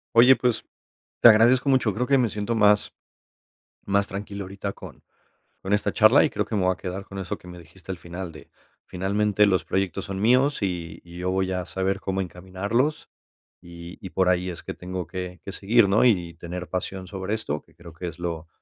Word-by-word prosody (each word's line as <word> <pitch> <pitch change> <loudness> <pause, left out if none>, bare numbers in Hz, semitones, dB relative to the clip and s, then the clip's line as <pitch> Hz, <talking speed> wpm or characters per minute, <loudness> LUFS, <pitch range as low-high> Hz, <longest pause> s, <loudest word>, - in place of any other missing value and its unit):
Oye, 125 +3 +8
pues, 115 -2 0 0.6
te - - +10
agradezco 120 +5 +5
mucho. 130 -5 +3
Creo 125 +6 -1
que 140 - +4
me 120 -4 +2
siento 105 +3 -2
más 105 -1 +3 0.9
más 100 0 +1
tranquilo 100 0 -6
ahorita 100 +1 -5
con - - -12 0.6
con 95 - -4
esta 105 0 +1
charla, 115 +6 +6
y 155 - +1
creo - - -1
que - - -5
me 100 - +1
voy 90 0 +3
a - - -6
quedar 95 +1 -6
con 95 - -9
eso 95 -2 -4
que 90 - -15
me 90 0 -10
dijiste 85 +3 -14
al 95 - -4
final 85 +1 -7
de, 75 -1 -13 0.4
finalmente, 100 +2 +1
los 95 -3 +2
proyectos 95 -4 -1
son 95 -1 -5
míos 125 +5 +3
y 90 -4 -3
y 85 0 -11
yo 90 +1 -1
voy 95 0 0
a 90 -1 -3
saber 95 +1 -1
cómo 95 0 -2
encaminarlos, 100 - -2 0.5
y 85 0 -11
y - - -5
por 95 0 +1
ahí 90 0 +2
es 85 - -7
que - - -5
tengo 90 -1 -6
que 90 0 -6
que 100 - -5
seguir, 105 +3 +3
¿no?, 100 +2 +3
y 90 -9 +2
tener 85 +2 -7
pasión 95 +2 -4
sobre 95 +2 -4
esto, 75 -9 -3
que 80 - -27
creo 85 -2 -13
que 85 +3 -6
es 85 -1 -8
lo 85 -2 -4
95 Hz, 215 wpm, -25 LUFS, 90-105 Hz, 0.9 s, te